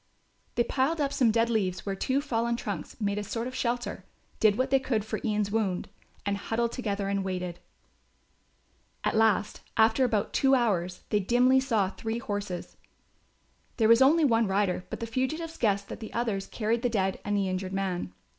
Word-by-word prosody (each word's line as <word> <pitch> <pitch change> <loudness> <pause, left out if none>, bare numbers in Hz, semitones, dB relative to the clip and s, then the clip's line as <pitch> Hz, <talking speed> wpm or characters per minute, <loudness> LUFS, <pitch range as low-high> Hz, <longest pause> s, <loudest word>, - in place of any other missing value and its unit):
They 240 - +3
piled 275 +7 0
up 280 -1 0
some 245 -4 +3
dead 230 +1 +3
leaves 190 -6 -1
where 200 - -1
two 260 +8 0
fallen 235 -4 0
trunks 235 - -5
made 205 -1 0
a - - -3
sort 230 +3 -3
of 255 - -5
shelter, 240 -1 -2 0.4
did 215 -2 +4
what 260 +1 0
they 270 - +5
could 230 -5 -1
for 220 - -3
Ian's 210 -2 0
wound 200 -5 -1 0.4
and 200 0 0
huddled 230 +3 -1
together 205 -5 -2
and 200 0 0
waited. 180 -2 -4 1.4
At - - 0
last, 220 -1 +2 0.2
after 225 +4 +4
about 225 -5 0
two 270 0 +4
hours, 185 -8 0
they 210 - +3
dimly 245 +6 +4
saw 225 -8 +1
three 225 +2 -4
horses. 205 -5 -5 1.0
There 220 - +4
was 230 +2 +6
only 305 +4 +6
one 230 -4 +3
rider, 190 -2 0
but - - -6
the - - -1
fugitives 310 +8 -2
guessed 200 -3 +1
that - - -6
the 220 - -8
others 220 -5 -1
carried 225 +1 -1
the 245 - +1
dead 195 -4 0
and 205 0 0
the 195 -1 +1
injured 185 0 -3
man. 190 - -2
220 Hz, 185 wpm, -28 LUFS, 200-245 Hz, 1.4 s, was